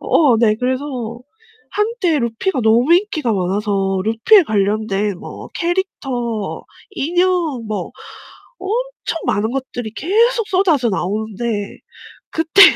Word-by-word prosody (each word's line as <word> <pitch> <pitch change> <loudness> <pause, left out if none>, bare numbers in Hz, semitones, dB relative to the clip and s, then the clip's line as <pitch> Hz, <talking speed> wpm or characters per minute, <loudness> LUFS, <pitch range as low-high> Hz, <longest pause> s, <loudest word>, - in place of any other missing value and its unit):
어 275 -8 +4
네. 220 -2 +4
그래서 255 -3 -2 0.5
한때 420 -6 0
루피가 235 +7 -1
너무 240 +9 +4
인기가 350 - +1
많아서 195 0 0
루피에 230 - +5
관련된 205 -2 0
뭐 - - -9
캐릭터, 265 - -2 0.3
인형 350 - 0
뭐 215 -1 -3 0.7
엄청 470 -2 -3
많은 210 +2 +1
것들이 245 -4 -4
계속 455 - +2
쏟아져 335 -10 +2
나오는데 210 +2 -3 0.5
그때 325 +4 +4
250 Hz, 230 characters per minute, -18 LUFS, 215-355 Hz, 0.7 s, 루피에